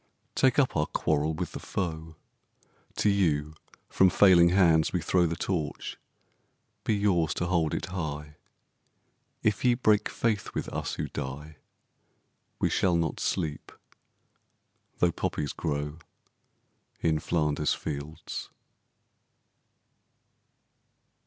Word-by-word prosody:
Take 130 -2 +3
up 140 -3 +3
our 75 -1 +1
quarrel 75 +2 0
with 85 +1 -4
the - - -6
foe: 80 -3 -4 0.8
To - - +1
you 80 -7 +2 0.3
from 95 - +4
failing 90 -2 +6
hands 85 -4 +4
we 90 - 0
throw 90 +1 +2
The 85 - -2
Torch: 85 -4 -3 0.9
be 110 - +1
yours 90 -7 +1
to 85 - -1
hold 85 -3 +1
it - - -3
high! 75 -5 -5 1.1
If 105 -1 +1
ye 125 -1 +4
break 110 -4 +2
faith 110 -4 -1
with - - -2
us - - -3
who - - -3
die 75 +3 -6 1.0
We - - +1
shall 90 -2 +2
not 85 -1 -1
sleep, 80 -6 -2 1.3
though 90 - +3
poppies 75 -3 -2
grow 75 +1 -3 1.0
In 80 -2 +2
Flanders 75 -2 0
fields. 75 +1 -6
80 Hz, 115 wpm, -28 LUFS, 75-95 Hz, 1.3 s, failing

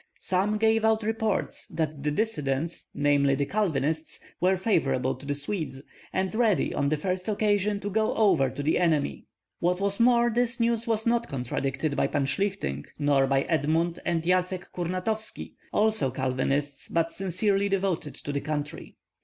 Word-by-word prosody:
Some 195 +3 +1
gave 220 0 +3
out 220 0 +3
reports 220 -1 -1
that 155 -3 -3
the 150 - 0
dissidents, 150 -5 -2
namely 145 -1 +3
the 140 +1 0
Calvinists, 160 -5 -1 0.2
were 185 +1 +3
favorable 135 - +1
to 140 - -10
the 145 - 0
Swedes, 145 -1 -3 0.3
and 190 +1 -1
ready 220 -5 +2
on 140 -1 +1
the 155 - +1
first 185 +3 -2
occasion 205 -1 +1
to 205 - -3
go 220 +2 +1
over 180 -12 +4
to 135 +3 -5
the 155 - +2
enemy. 155 - +1 0.3
What 180 +1 +1
was 200 +1 0
more, 240 0 +4
this 240 +1 +1
news 230 0 +1
was 220 -1 0
not 235 0 +2
contradicted 135 +3 -2
by - - +2
Pan 140 - 0
Shlihtyng 135 - -2
nor 145 -2 +3
by 135 0 +2
Edmund 165 +2 0
and 170 -2 0
Yatsck 180 +1 0
Kurnatovski, 185 +5 -3 0.2
also 215 -10 +3
Calvinists, 135 +2 -1
but 165 0 0
sincerely 195 +2 0
devoted 190 -6 -1
to 145 - -6
the 140 0 -2
country. 145 -1 -5
175 Hz, 160 wpm, -27 LUFS, 145-210 Hz, 0.3 s, over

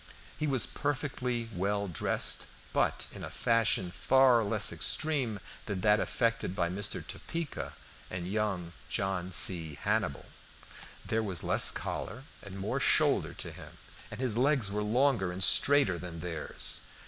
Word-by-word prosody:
He 150 - 0
was 130 -5 +2
perfectly 125 -4 -2
well 100 +2 -1
dressed, 90 - 0 0.3
but - - +1
in - - -9
a - - -5
fashion 110 -6 +1
far 130 +2 +4
less 100 - +2
extreme 135 -9 -1 0.3
than 100 -4 -3
that 105 +1 +4
affected 115 -6 -1
by 85 -3 0
Mr. 100 +2 -2
Topeka 165 -2 -5 0.4
and 90 -1 -5
young 95 -4 -2 0.2
John 95 -2 -2
C. 85 -5 +2
Hannibal. - - -1 0.8
There 115 0 0
was 95 -7 -1
less - - +5
collar 130 - -4 0.2
and 100 -1 -9
more 95 - -2
shoulder - - +2
to - - -5
him, - - -12 0.3
and 105 - -9
his 120 -3 +1
legs 130 -7 +3
were 105 +1 -1
longer 115 -3 +1
and 95 +2 -2
straighter 140 -11 +5
than 85 -2 -7
theirs. 80 -3 -2
105 Hz, 145 wpm, -30 LUFS, 90-125 Hz, 0.8 s, less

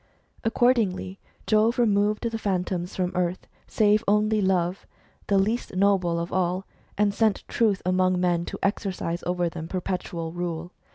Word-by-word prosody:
Accordingly, 225 -5 +1 0.3
Jove 220 +2 +3
removed 210 -2 +2
the 225 -1 -3
Phantoms 180 -3 -2
from 180 -1 -1
earth, 180 0 -1 0.2
save 210 0 +3
only 210 +1 +3
Love, 185 -1 0 0.4
the 200 - +3
least 210 +1 0
noble 185 -3 +2
of 170 +1 -4
all, 185 +1 0 0.3
and 205 0 +2
sent 215 -1 +1
Truth 215 -5 +1
among 185 0 +2
men 175 -1 +1
to - - -6
exercise 190 -4 -1
over 175 -1 0
them 165 -1 -6
perpetual 180 -2 -3
rule. 175 0 -4
185 Hz, 145 wpm, -25 LUFS, 180-210 Hz, 0.4 s, Jove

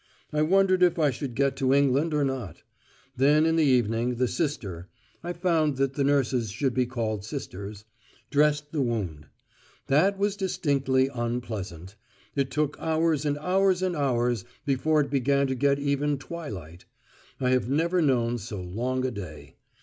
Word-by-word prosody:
I 150 - +1
wondered 185 +3 +3
if 175 -1 +4
I 150 -4 +3
should 130 -1 -5
get 140 +1 +1
to 135 0 +2
England 140 +3 +2
or 150 -2 +1
not. 130 - -5 0.5
Then 145 +4 +4
in 160 0 +2
the 165 - +3
evening 120 -2 +2
the 125 +1 +1
sister 100 - -3 0.4
(I 175 - -3
found 165 -5 +1
that 135 0 0
the 140 - 0
nurses 135 -5 +1
should 125 +6 -1
be 125 -1 +1
called 110 -5 -3
sisters) 105 -4 -7 0.5
dressed 150 0 +2
the 155 - -1
wound. 95 - -3 0.6
That 185 +9 +3
was 200 0 0
distinctly 140 -9 +1
unpleasant. 110 -7 -4 0.4
It 140 -2 0
took 150 +2 -1
hours 160 -2 +1
and 145 0 0
hours 185 +3 +2
and 185 -2 0
hours 120 -6 0 0.2
before 150 +3 +2
it 140 - -3
began 140 0 +2
to 130 - -1
get 140 +2 +2
even 140 0 0
twilight. 105 - -8 0.5
I 125 -1 +1
have 125 -1 +1
never 170 +5 +1
known 120 -5 +1
so 105 -1 -6
long 120 +9 -2
a 130 - -1
day. 90 -9 -9
135 Hz, 165 wpm, -26 LUFS, 120-150 Hz, 0.6 s, if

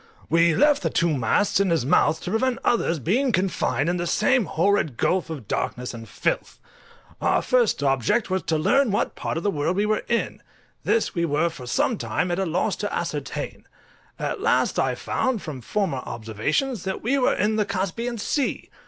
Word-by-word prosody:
We 165 0 +4
left 295 0 +4
the - - 0
two 165 -2 +1
masts 140 - +2
in 200 -1 +2
his 165 -7 +1
mouth, 155 +3 +3
to 180 - -4
prevent 245 +3 +1
others 205 -8 +1
being 240 - +1
confined 175 - 0
in 175 +1 +1
the 175 0 -2
same 230 +5 +2
horrid 170 - +1
gulf 180 -2 +1
of 140 -10 -7
darkness 125 0 -3
and 115 -2 -9
filth. 95 - -2 0.6
Our - - +2
first 240 -11 +2
object 135 - +1
was 190 0 -1
to 160 - 0
learn 270 - +3
what 205 - 0
part - - -3
of 165 - -3
the 205 - +1
world 150 +2 -1
we 205 +2 +1
were 215 0 +1
in; 235 -1 -1 0.4
this 230 - +1
we 170 - -1
were 165 +1 +1
for 125 -6 -10
some 225 - 0
time 180 - -1
at 175 - -1
a 190 - 0
loss 170 +3 0
to - - -3
ascertain: - - -4 0.5
at - - -3
last 455 +2 +2
I - - +1
found, 255 -6 -1
from 145 -6 -6
former 190 - -1
observations, 125 - -2
that 190 -1 -4
we 270 +5 +1
were 250 - +2
in 215 +3 +1
the 210 - +2
Caspian 200 +6 -2
Sea! 270 +6 -2
185 Hz, 195 wpm, -24 LUFS, 155-225 Hz, 0.6 s, We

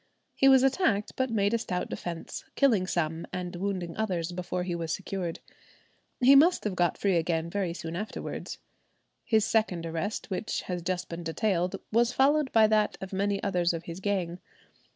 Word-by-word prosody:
He 270 - +5
was 265 -1 +6
attacked, 270 - +2
but 260 0 0
made 205 -2 +1
a 230 - +2
stout 180 -5 -3
defence, 170 -2 -6
killing 225 -10 +3
some 165 -2 -1
and 180 -1 -4
wounding 180 -2 -3
others 180 -6 -1
before 180 0 -3
he 180 -1 -3
was 165 -2 -3
secured. 185 -3 -3 0.8
He 260 +2 +7
must 335 +6 +5
have 210 - -1
got 175 -1 +1
free 195 -3 +2
again 165 0 -1
very 195 -3 -1
soon 165 -1 -6
afterwards. 210 +4 -5 0.7
His 220 -2 +2
second 195 -8 +1
arrest, 165 +7 -3
which 190 +3 -2
has 180 -1 -4
just 180 +1 -2
been 170 0 -6
detailed, 180 +2 0 0.2
was 235 +2 +3
followed 280 +2 +3
by 225 -1 +6
that 215 -1 +2
of 190 0 -7
many 200 +1 0
others 180 -3 +1
of 165 0 -4
his 170 +1 -7
gang. 185 -3 -2
190 Hz, 175 wpm, -28 LUFS, 175-220 Hz, 0.8 s, He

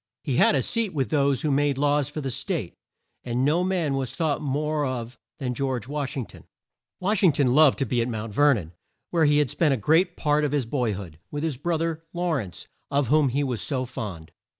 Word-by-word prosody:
He 130 -3 -1
had - - +5
a 135 - +2
seat 220 - -1
with 135 -3 -1
those 140 -4 +2
who 150 - +1
made 140 0 +2
laws 145 0 +2
for 155 +1 -5
the 135 -2 -3
State, - - -3 0.5
and 125 +1 0
no 160 +5 +2
man 180 -6 0
was 135 -2 -3
thought 155 -4 0
more 150 +1 -1
of 125 -2 -4 0.2
than 125 -2 -3
George 130 -2 -2
Wash 145 0 -3
ing 125 - -2
ton. - - -15 0.5
Wash 195 +2 +1
ing 180 - +6
ton 135 -3 +2
loved 150 -1 +6
to 135 - 0
be 120 0 0
at 115 - -1
Mount 110 -2 -4
Ver 145 +3 +5
non, 85 -7 -6 0.4
where 165 -2 +3
he 145 0 +4
had 150 -3 +2
spent 145 -1 +2
a - - -4
great 165 - +2
part 150 -1 +2
of 145 -1 0
his 140 -4 +1
boy 120 -3 -1
hood, 90 -5 -8
with 145 +1 -4
his 160 -4 -1
bro 165 +4 -1
ther, 165 0 -2
Law 175 0 -1
rence, 110 - -3 0.2
of 140 -3 +1
whom 150 -2 +4
he 140 +4 0
was 125 -5 -2
so 130 -3 -1
fond. 100 -10 -7
140 Hz, 235 wpm, -25 LUFS, 125-155 Hz, 0.5 s, ing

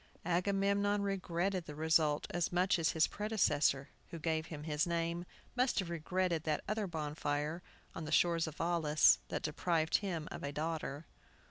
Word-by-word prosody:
Agamemnon 200 +3 +1
regretted 185 -2 -1
the 150 - -7
result 155 -1 +2
as 175 -1 0
much 180 0 +2
as 165 - +1
his 160 -1 +4
predecessor, 150 -10 +1 0.2
who 170 - -6
gave 160 0 -1
him 150 -3 -7
his 150 +1 0
name, 170 +1 -1 0.3
must 250 +1 +1
have 185 -4 0
regretted 170 0 -1
that 155 -2 -1
other 215 -1 -1
bonfire, 150 0 -2 0.3
on 165 - -6
the 155 - -5
shores 170 0 +3
of 160 - -8
Aulis, 165 -3 +4
that - - -3
deprived 160 +1 +1
him 170 -6 -3
of - - -6
a 140 - -3
daughter. 155 -1 -3
165 Hz, 160 wpm, -34 LUFS, 155-180 Hz, 0.3 s, his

